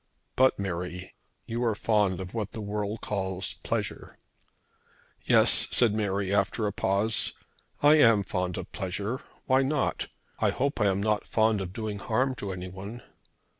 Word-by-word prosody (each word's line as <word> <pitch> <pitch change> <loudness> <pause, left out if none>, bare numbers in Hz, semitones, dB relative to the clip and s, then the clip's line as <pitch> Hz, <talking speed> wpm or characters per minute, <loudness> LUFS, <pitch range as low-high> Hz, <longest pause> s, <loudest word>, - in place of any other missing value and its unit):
But 130 0 +4
Mary, 90 -1 -4 0.3
you 120 +2 -3
are 115 -3 +1
fond 105 -4 +1
of 95 -1 -7
what 110 -3 -3
the - - -6
world 105 0 -3
calls 95 -2 -2
pleasure." - - -4 1.1
"Yes," - - +6
said 115 -4 +3
Mary, 100 -2 -1
after 100 +2 +1
a 100 - -1
pause, 100 +3 +1 0.5
"I 150 +1 +7
am 115 -6 +6
fond 90 -1 -2
of - - -7
pleasure. 100 +6 -3 0.2
Why 130 +1 +4
not? 140 +1 0 0.3
I - - +3
hope 140 -2 -1
I 105 - +4
am 100 0 +1
not 105 -1 +1
fond 110 -2 +2
of 90 -2 -5
doing 105 0 -4
harm 125 +6 0
to 100 - -4
anyone." 95 +5 -7
105 Hz, 155 wpm, -28 LUFS, 95-115 Hz, 1.1 s, I